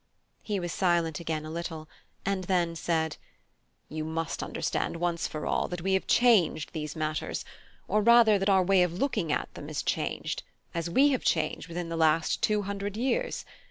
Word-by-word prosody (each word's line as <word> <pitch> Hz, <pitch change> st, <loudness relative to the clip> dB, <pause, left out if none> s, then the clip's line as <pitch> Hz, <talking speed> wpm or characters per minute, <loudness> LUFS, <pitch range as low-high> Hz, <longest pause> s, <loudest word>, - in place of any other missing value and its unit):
He 205 Hz, -2 st, -2 dB
was 175 Hz, -1 st, -3 dB
silent 170 Hz, -4 st, +1 dB
again 160 Hz, -2 st, -3 dB
a 155 Hz, -, -6 dB
little, 165 Hz, -2 st, -5 dB, 0.4 s
and 195 Hz, -2 st, -1 dB
then 175 Hz, -2 st, +1 dB
said: 160 Hz, -2 st, -1 dB, 0.7 s
"You 155 Hz, 0 st, -4 dB
must 160 Hz, +1 st, -3 dB
understand -, -, -2 dB
once 170 Hz, 0 st, -1 dB
for 155 Hz, -, -5 dB
all -, -, 0 dB
that 175 Hz, -1 st, -5 dB
we 190 Hz, 0 st, +1 dB
have 190 Hz, -, +1 dB
changed 200 Hz, -11 st, +3 dB
these 150 Hz, -2 st, -4 dB
matters; 155 Hz, -1 st, -2 dB, 0.4 s
or 210 Hz, +2 st, +2 dB
rather, 230 Hz, -2 st, +6 dB
that 195 Hz, +1 st, +1 dB
our 190 Hz, -1 st, +5 dB
way 190 Hz, 0 st, +4 dB
of 180 Hz, -2 st, +2 dB
looking 195 Hz, -, -1 dB
at -, -, -2 dB
them -, -, -8 dB
has -, -, -3 dB
changed, -, -, -2 dB, 0.3 s
as 170 Hz, 0 st, -2 dB
we 270 Hz, +12 st, +5 dB
have 260 Hz, -3 st, 0 dB
changed 160 Hz, +1 st, 0 dB
within 170 Hz, 0 st, -4 dB
the 165 Hz, -, -3 dB
last 160 Hz, 0 st, +2 dB
two 210 Hz, -1 st, +2 dB
hundred 200 Hz, +1 st, -4 dB
years. 470 Hz, -, -1 dB
175 Hz, 185 wpm, -28 LUFS, 160-200 Hz, 0.7 s, rather